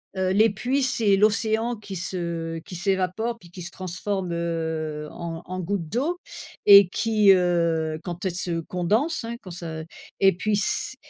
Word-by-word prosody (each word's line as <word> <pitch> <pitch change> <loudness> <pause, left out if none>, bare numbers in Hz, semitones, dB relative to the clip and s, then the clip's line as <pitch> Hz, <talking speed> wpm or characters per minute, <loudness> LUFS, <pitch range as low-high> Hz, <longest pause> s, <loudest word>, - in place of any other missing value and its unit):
heu, 190 0 0
les 215 +3 +5
pluies, 255 +7 -1
c'est 220 -6 +3
l'océan 220 +3 +2
qui 205 -2 -8
se 170 -2 -3
qui 180 +2 -10
s'évapore 195 +5 -1
puis 175 - -16
qui 180 - -9
se 170 0 -5
transforme, 185 0 -4
heu, 160 -2 -3
en 165 -1 -6
en 185 0 -5
gouttes 180 -2 -2
d'eau 320 +9 -1 0.5
et 200 -3 +9
qui, 215 -2 +4
heu, 170 -3 +2
quand 175 +1 -6
elles 180 -2 -1
se 175 -2 -2
condensent, 215 - 0
hein, 230 +1 -4
quand 185 - -10
ça 165 -2 -6 0.4
et 195 -2 +5
puis 215 +4 -1
s 210 +5 0
185 Hz, 170 wpm, -24 LUFS, 170-215 Hz, 0.5 s, et